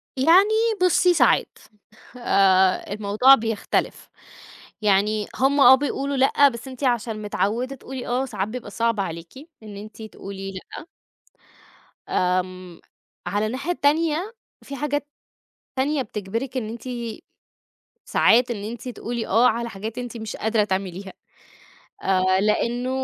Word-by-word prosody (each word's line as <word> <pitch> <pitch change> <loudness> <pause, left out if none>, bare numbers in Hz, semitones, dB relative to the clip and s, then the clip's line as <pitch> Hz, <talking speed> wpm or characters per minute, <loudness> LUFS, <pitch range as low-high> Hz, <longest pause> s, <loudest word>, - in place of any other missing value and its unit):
يعني 340 +10 +5 0.3
بُصي 360 0 +4
ساعات، 345 - +2 0.6
آآ 190 -4 +3
الموضوع 215 +6 +5
بيختلف. 225 -4 -2 0.7
يعني 210 +1 +2
هُم 275 +2 +2
آه 260 0 +9
بيقولوا 280 0 -1
لأ، 275 +2 +5
بس 235 +1 -8
أنتِ 260 +1 -7
عشان 230 -3 -1
متعوّدة 230 +6 -2
تقولي 260 -1 -8
آه، 250 +2 0
ساعات 210 -5 -3
بيبقى 235 -2 -7
صعب 230 0 0
عليكِ 170 +4 -6 0.2
إن 210 -2 -10
أنتِ 215 +2 -10
تقولي 195 -2 -8
لأ. 190 - -10 1.2
آمم، 185 -1 -2 0.5
على 205 +4 0
الناحية 265 +10 -2
تانية، 325 +8 +1 0.3
في 275 - -8
حاجات 290 +1 -2 0.7
تانية 275 +2 0
بِتِجبِرِك 230 +4 -5
إن 220 -4 -2
أنتِ 230 0 -8 1.2
ساعات 245 +2 +3
إن 205 -4 -4
أنتِ 230 +3 -7
تقولي 235 0 -4
آه 230 +5 +4
على 235 0 +1
حاجات 220 +3 -7
أنتِ 245 -1 -6
مش 220 -1 -6
قادرة 220 -1 +1
تعمليها 190 -1 -4 0.9
آآ، 185 0 +2
لأنه 235 +4 0
230 Hz, 125 wpm, -23 LUFS, 200-265 Hz, 1.2 s, آه